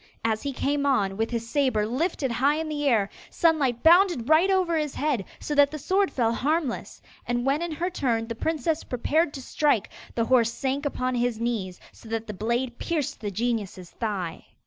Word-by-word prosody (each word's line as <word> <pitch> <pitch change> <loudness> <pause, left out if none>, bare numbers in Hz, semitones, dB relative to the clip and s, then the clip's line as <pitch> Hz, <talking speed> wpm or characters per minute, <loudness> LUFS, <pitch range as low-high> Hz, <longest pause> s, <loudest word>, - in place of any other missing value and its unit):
As 220 -1 +1
he 285 - -3
came 280 +2 0
on, 200 -8 +2
with 225 +2 -1
his 230 -1 -3
sabre 250 -5 +1
lifted 265 - -1
high 270 +5 +2
in 320 0 -3
the 295 -1 -1
air, 215 -5 +3 0.2
Sunlight 290 -8 +1
bounded 340 - +5
right 320 +5 +5
over 370 -3 +2
his 300 -3 -1
head, 285 -8 0 0.2
so 300 - -4
that 285 -1 +5
the 305 - -6
sword 380 +7 +1
fell 230 -3 +1
harmless. 290 +1 -2 0.2
And 240 0 -1
when 275 +4 +1
in 340 -1 -2
her 350 +4 -2
turn 235 -9 0
the 230 - -4
princess 320 +5 -1
prepared 295 +6 0
to 270 - -7
strike, 285 -7 +1 0.2
the 230 - +1
horse 235 -2 +3
sank 275 +3 -2
upon 255 -2 -2
his 240 -2 0
knees, 220 -6 -2
so 225 - -15
that 225 0 -2
the 210 - -6
blade 235 +4 -2
pierced 295 -6 -2
the 210 - -2
genius's 205 -4 -3
thigh. 195 -7 -4
260 Hz, 195 wpm, -26 LUFS, 230-305 Hz, 0.2 s, bounded